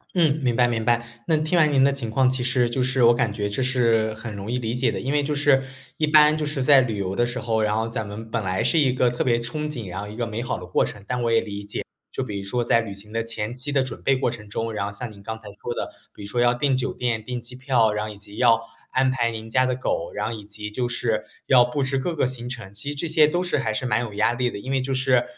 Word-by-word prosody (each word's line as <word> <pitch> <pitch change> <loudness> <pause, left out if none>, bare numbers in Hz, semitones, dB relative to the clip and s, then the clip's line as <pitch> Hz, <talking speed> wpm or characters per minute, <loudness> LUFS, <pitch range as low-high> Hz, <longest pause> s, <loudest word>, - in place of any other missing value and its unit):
嗯， 155 -4 +3
明 120 -2 +2
白 120 0 +4
明 115 -2 -1
白。 120 +1 +2 0.2
那 160 - +3
听 155 +3 0
完 155 -3 +5
您 135 -1 +4
的 140 0 +4
情 120 -5 -4
况， 130 +2 +3
其 130 -1 -2
实 125 -1 +2
就 125 +2 -1
是 130 -1 +2
我 120 - +7
感 120 -3 +1
觉 105 -1 -2
这 100 +5 -3
是 115 -4 +2
很 110 -1 -7
容 100 +3 -5
易 125 - 0
理 115 -2 -2
解 125 +1 +1
的。 - - -3
因 135 +2 -2
为 145 - +3
就 150 +1 -1
是， 140 -2 +4 0.3
一 155 - +2
般 150 0 +6
就 155 -1 -2
是 145 -3 -2
在 135 -1 +7
旅 115 -4 -2
游 95 -1 -2
的 120 - +2
时 120 +1 -4
候， 110 -3 0
然 105 0 +1
后 110 +1 0
咱 115 -2 -3
们 105 +2 -7
本 115 -3 -1
来 95 0 0
是 165 - +3
一 135 -4 +4
个 125 -1 +2
特 120 - -1
别 120 -2 +3
憧 120 +6 -3
憬， 120 -10 -4
然 95 +2 -5
后 105 - -6
一 105 - -9
个 120 - -1
美 110 +1 -4
好 125 - -2
的 90 - -8
过 90 - +2
程。 100 -1 -6
但 125 -1 -1
我 115 -1 +1
也 115 - +5
理 100 -2 -6
解， 100 - -5 0.3
就 135 - -2
比 105 -5 -4
如 100 - -6
说 120 +4 0
在 115 0 +3
旅 110 - -6
行 105 +2 -12
的 115 0 0
前 110 0 -3
期 130 +3 -4
的 135 -2 +2
准 130 - -7
备 135 - +3
过 130 - 0
程 105 -3 -9
中， 115 +2 -3
然 105 - -2
后 100 - -3
像 110 +3 -6
您 100 -1 -14
刚 110 +2 -5
才 110 - -13
说 120 - -3
的， - - -4 0.2
比 - - -11
如 - - -6
说 120 +4 0
要 120 0 +4
订 135 +2 +2
酒 130 +1 -1
店， 115 -3 -1
订 125 +2 -4
机 120 +2 -11
票， 125 -4 +2
然 105 - -1
后 - - -6
以 105 - -10
及 100 +1 -11
要 115 -2 +5 0.3
安 130 0 +3
排 120 -3 +1
您 110 -1 -6
家 130 +3 +2
的 130 - 0
狗， 85 -9 -2
然 - - -1
后 115 - -2
以 105 -2 -7
及 105 0 -6
就 120 +2 -1
是 115 -3 -1 0.2
要 125 -2 +6
布 125 +3 -1
置 135 0 0
各 165 +5 -2
个 145 - +2
行 125 -1 -4
程， 115 -6 -7
其 100 +8 -5
实 145 - -3
这 155 +4 -3
些 155 -1 +5
都 175 +4 0
是 175 -5 0
还 110 -5 -1
是 125 - -2
蛮 115 -1 +1
有 110 -4 -6
压 110 +2 +2
力 125 0 0
的。 - - -6
因 130 +5 -6
为 135 - +1
就 135 +1 -3
是， 130 -2 +3
120 Hz, 340 characters per minute, -24 LUFS, 110-130 Hz, 0.3 s, 我